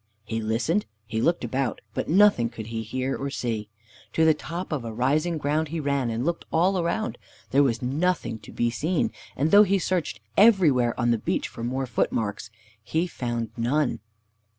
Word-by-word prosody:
He 115 +1 -3
listened, 115 - 0 0.2
he 110 0 -2
looked 170 +4 +1
about, 125 0 -1
but - - -3
nothing 180 - +5
could 115 -2 -8
he 115 0 -4
hear 130 +4 -2
or 140 - -3
see. 115 -6 -3 0.4
To 160 - +3
the 160 - +6
top 170 +4 -6
of 145 -6 -2
a 115 - -5
rising 150 +9 +1
ground 155 +2 0
he 165 +2 -4
ran, 140 -4 0
and 115 +3 -2
looked 170 +1 -1
all 185 +3 +3
around. 175 +6 -1 0.3
There 140 - +5
was 125 -4 +1
nothing 135 -4 0
to - - -13
be 120 0 0
seen. 160 +8 0 0.2
And 150 +4 +1
though 205 - +9
he 200 -1 +4
searched 175 - -1 0.2
everywhere 160 - +4
on 120 -1 +2
the 115 - +1
beach - - -1
for 115 - -8
more 130 +3 -1
footmarks, 110 -3 -1 0.3
he 160 +10 0
found 120 -8 -3
none. 125 +4 0
135 Hz, 185 wpm, -25 LUFS, 115-165 Hz, 0.4 s, though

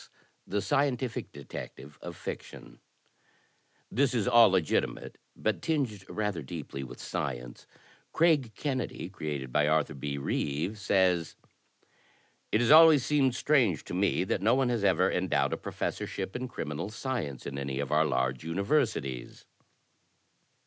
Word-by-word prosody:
T/ie 100 - -1
ScietUific 130 +1 -1
Detective 70 +2 -9
of - - -7
Fiction - - -8 1.1
This 130 +1 +2
is 110 -5 +1
all 115 -1 +7
legitimate, 95 -5 -1 0.2
but 110 - -1
tinged 135 - -2
rather 105 -5 -2
deeply 70 -1 -6
with 65 - -10
science. - - -5 0.4
Craig 155 -8 +3
Kennedy 130 - -3
(created 70 -8 -5
by 75 0 +3
Arthur 75 -2 +2
B. 70 +1 -4
Reeve) 75 +8 -2
says: 90 -4 +2 0.6
" - - -36
It 110 - +3
has 120 - +3
always 155 -4 +8
seemed 135 -4 +2
strange 125 - +2
to - - -8
me 95 0 +1
that 95 - -1
no 110 +5 +4
one 130 -2 +2
has 120 -4 0
ever 95 -1 +3
endowed 75 -7 +1
a - - -1
professorship - - -4
in 130 +1 -3
criminal 85 - -4
science 110 - -4
in 70 -1 -4
any 70 -1 -3
of 70 0 -3
our 75 +1 +4
large 65 -3 0
imiversities." 95 - -1
95 Hz, 140 wpm, -29 LUFS, -, 1.1 s, always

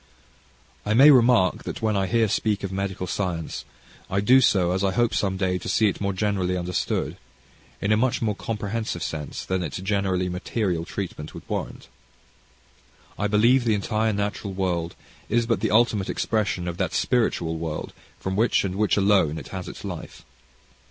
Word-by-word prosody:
I 105 +1 0
may 140 +5 +9
remark, 120 -8 +4
that - - -6
when 110 -1 +1
I 95 -1 +1
here 115 +4 +2
speak 105 0 0
of 100 - -3
medical 95 -1 -3
science, 90 -3 -3 0.4
I 95 - 0
do 125 +6 +5
so, 90 -7 +3
as 95 +2 0
I 95 -1 +1
hope 120 +1 +2
some 95 -2 0
day 95 -1 0
to - - -6
see 110 -2 +3
it - - -6
more 100 0 0
generally 95 -2 0
understood, 90 0 -2 0.6
in 100 - 0
a 105 - +4
much 125 +2 +1
more 110 -2 0
comprehensive 110 -4 -3
sense 75 -2 -5
than 95 0 -1
its 80 -6 -4
generally 95 -1 0
material 90 -1 -2
treatment 85 -6 -6
would - - -10
warrant. - - -4 1.3
I 105 - +1
believe 115 +5 +4
the 115 -3 +2
entire 110 +2 0
natural 100 -1 -3
world 90 -3 -2 0.3
is 120 +1 +2
but 115 -4 +1
the 110 - 0
ultimate 110 -3 +2
expression 100 -5 -1
of 85 -1 -4
that - - -1
spiritual 110 -9 +1
world 80 -2 -4 0.3
from 95 0 -3
which, 115 +4 +3
and 95 -2 -2
in 95 - -6
which 105 -1 +2
alone, 95 -6 +3
it - - -8
has 95 -2 -6
its - - -9
life. - - -8
100 Hz, 180 wpm, -24 LUFS, 90-110 Hz, 1.3 s, may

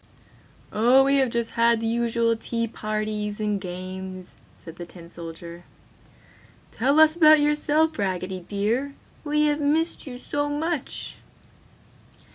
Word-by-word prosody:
"Oh 245 +5 +5
we 275 +1 +3
have 265 -2 +2
just 235 -1 -2
had 235 0 +3
the 225 - -4
usual 230 0 +1
tea 230 +1 -3
parties 215 -1 -3
and 210 -2 -1
games!" 185 0 -7 0.2
said 165 -1 -12
the 175 - -7
tin 170 -1 -13
soldier. 170 0 -9 1.1
"Tell 275 +6 +2
us 315 0 +6
about 310 -2 +7
yourself, 300 0 +1
Raggedy 185 -1 -2
dear, 215 +10 -2 0.3
we 300 0 +1
have 295 0 +1
missed 310 +2 0
you 250 -2 -7
so 290 +3 -2
much!" 305 0 -3
230 Hz, 130 wpm, -24 LUFS, 190-290 Hz, 1.1 s, about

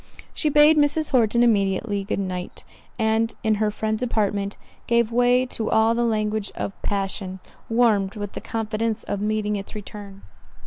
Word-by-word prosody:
She 310 - 0
bade 300 +2 +6
Mrs. 295 +1 +2
Horton 235 -2 +3
immediately 200 -2 +1
good 195 - -2
night; 185 -2 -4 0.3
and, 225 0 +1
in 220 -1 +3
her 215 - +3
friend's 215 +1 -2
apartment, 205 -4 -1 0.3
gave 235 -1 +2
way 245 +1 +3
to 225 -3 -3
all 220 +1 +4
the 240 +1 0
language 215 -2 0
of 195 - -4
passion, 195 -1 -3 0.3
warmed 220 -4 +2
with 205 -2 -5
the - - -7
confidence 225 0 -2
of 200 - -3
meeting 210 0 0
its 200 +1 -8
return. 200 -1 -9
215 Hz, 155 wpm, -23 LUFS, 200-235 Hz, 0.3 s, bade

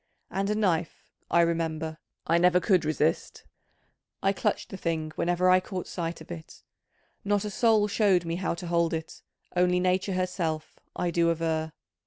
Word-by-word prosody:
And 195 +1 -1
a 210 - +1
knife, 175 -6 -1 0.2
I 170 - +4
remember, 160 -1 -1 0.3
I 170 +1 +3
never 180 +1 +5
could 180 -3 +2
resist: 155 +1 0 0.8
I 195 - +3
clutched 210 +1 -1
the - - -7
thing 160 -3 -2
whenever 175 +2 +1
I 185 0 +6
caught 185 -1 -5
sight 170 -1 -4
of - - -11
it: 80 -1 -10 0.6
not 205 0 +1
a 210 - -3
soul 220 -1 +3
showed 200 -4 +2
me 165 +1 -2
how 180 -2 -1
to 175 - -7
hold 170 -1 +1
it, 160 0 -7 0.3
only 180 0 +3
nature 185 +2 +1
herself, 180 -4 -2 0.2
I 175 - -1
do 170 0 +2
aver. 160 -1 -1
175 Hz, 170 wpm, -27 LUFS, 165-185 Hz, 0.8 s, I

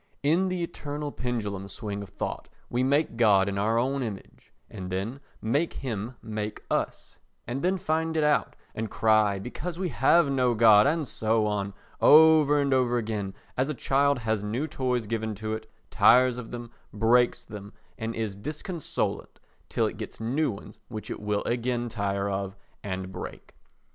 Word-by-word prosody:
In 165 +6 +3
the 180 -1 -2
eternal 145 -3 -5
pendulum 105 -7 -3
swing 100 +1 -5
of 100 - -8
thought - - -5 0.2
we 120 - +1
make 140 0 +1
God 100 -4 +5
in 100 0 -2
our 110 +3 +2
own 135 +3 +1
image, 110 -6 -7 0.2
and 90 -1 -7
then 100 +8 -3 0.2
make 145 +9 +1
him 120 -1 -4
make 105 -1 -4
us, - - -2 0.3
and 125 +4 -3
then 185 +2 +1
find 160 -1 -1
it 155 - +3
out 150 0 +2 0.2
and 110 0 -3
cry 110 -2 +3
because 155 - -5
we 185 -1 -1
have 145 +5 +4
no 125 -3 +2
God 110 -2 +7
and 155 -1 0
so 110 0 +1
on, 100 -1 -2 0.3
over 155 -1 +7
and 140 -1 +2
over 125 -2 +2
again 105 -4 -3 0.2
as 130 +3 0
a 150 - -2
child 140 +3 +2
has 110 -3 -1
new 115 +8 -1
toys 130 -6 -1
given 110 0 -2
to 110 +2 -4
it, 110 0 -6 0.2
tires 125 0 +5
of 115 - -8
them, 120 -1 -7 0.2
breaks 120 +3 +3
them 105 -1 -9 0.2
and 115 +1 -4
is 110 -3 -3
disconsolate 155 - -4 0.3
till - - +1
it - - -3
gets - - -7
new 135 +7 0
ones 100 -3 -9
which 110 -3 -7
it - - -4
will 105 0 -1
again 120 0 -1
tire 100 -2 -1
of 95 -1 -3 0.3
and 95 -1 -4
break. 90 - -8
115 Hz, 175 wpm, -27 LUFS, 105-140 Hz, 0.3 s, God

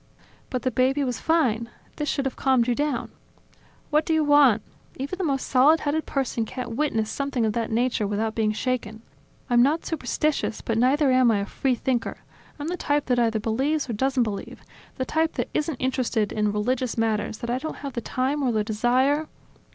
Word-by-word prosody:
"But 255 -2 -3
the 255 - +1
baby 265 +4 +2
was 250 -3 -2
fine. 235 -9 +1 0.3
This 295 -1 -2
should 275 - -1
have 270 - -2
calmed 260 -3 +2
you 245 - +2
down." 285 -1 -2 0.8
"What 300 +1 +3
do 320 - 0
you 315 - +3
want? 285 -7 +5 0.3
Even 275 +7 -4
the 380 - -2
most 275 -5 0
solid 285 +5 +4
headed 305 +2 -1
person 265 -4 -1
can't 240 0 -5
witness 225 -6 0
something 270 -2 -1
of 215 - 0
that 230 0 -2
nature 235 -2 0
without 215 +2 -1
being 220 -2 +1
shaken. 225 -1 -3 0.4
I'm 240 -2 +4
not 295 +6 +2
superstitious, 300 -3 -1
but 225 -1 -1
neither 270 +3 +3
am 255 -1 +5
I 210 -3 +2
a - - -2
free 260 +4 0
thinker. 240 0 -2 0.4
I'm 295 0 -5
the 360 - -2
type 290 -3 0
that 250 -1 +1
either 225 -2 +2
believes 270 +8 0
or 235 - -3
doesn't 265 +3 +1
believe, 210 -3 -6 0.3
the 260 - -2
type 320 +3 0
that - - -3
isn't 305 0 -1
interested 250 -5 0
in 210 -1 0
religious 240 +4 -1
matters 220 -1 0
that 235 0 -4
I 250 - 0
don't 315 +3 -5
have 275 - -4
the 235 - -3
time 265 +5 -1
or 260 -3 +1
the 215 -2 +1
desire 255 +8 +1
255 Hz, 200 wpm, -25 LUFS, 225-285 Hz, 0.8 s, want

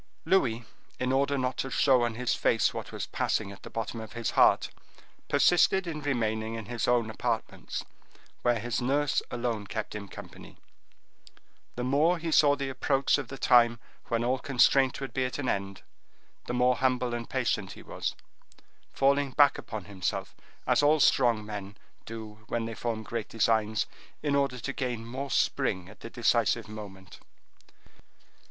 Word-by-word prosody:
Louis, 120 -11 +2 0.3
in 125 0 0
order 140 +1 +2
not 130 -1 -1
to 135 - -2
show 130 -1 +4
on 120 -1 0
his 125 +1 0
face - - +2
what - - -6
was - - -4
passing 100 -2 -1
at 100 - -12
the - - -10
bottom 115 0 -4
of 110 - -9
his 115 -1 -2
heart, - - +4 0.6
persisted 180 +2 +4
in 160 -3 -4
remaining 110 -5 -1
in 115 -1 -6
his 120 +1 -3
own 120 -2 +3
apartments, - - -3 0.6
where 120 -1 +2
his 120 +3 -2
nurse 140 +3 +1
alone 120 -4 -3
kept 110 +1 -4
him 105 -1 -6
company; - - -11 1.2
the 125 - -3
more 150 +7 +3
he 165 0 -4
saw 145 -2 +5
the 140 -1 -3
approach 135 +1 +1
of 135 - -5
the 135 - -8
time 120 -2 +5 0.3
when 115 0 -1
all 130 +2 +1
constraint 135 -1 +3
would 135 -1 -6
be 130 - 0
at 125 - -3
an 145 -3 -3
end, 100 -2 -2 0.6
the 120 - -2
more 125 0 +3
humble 125 -1 +1
and 120 -1 -4
patient 115 -7 -1
he - - -12
was, - - -4 0.8
falling 140 +1 +2
back 145 +2 +4
upon 110 -5 -7
himself, 95 -3 -4 0.3
as - - +3
all 150 +2 +4
strong 120 -6 +3
men 100 -1 -7 0.3
do 110 -1 -8
when 115 -1 -2
they 115 - -5
form 115 -1 -3
great 115 0 -4
designs, 110 -1 +1 0.4
in 145 -2 +1
order 140 -2 +1
to 140 +4 -4
gain 125 -4 -3
more 130 +4 -5
spring 95 -7 0
at 100 -2 -15
the 115 - -8
decisive 115 -2 +1
moment. 100 -3 -10
120 Hz, 170 wpm, -29 LUFS, 110-135 Hz, 1.2 s, saw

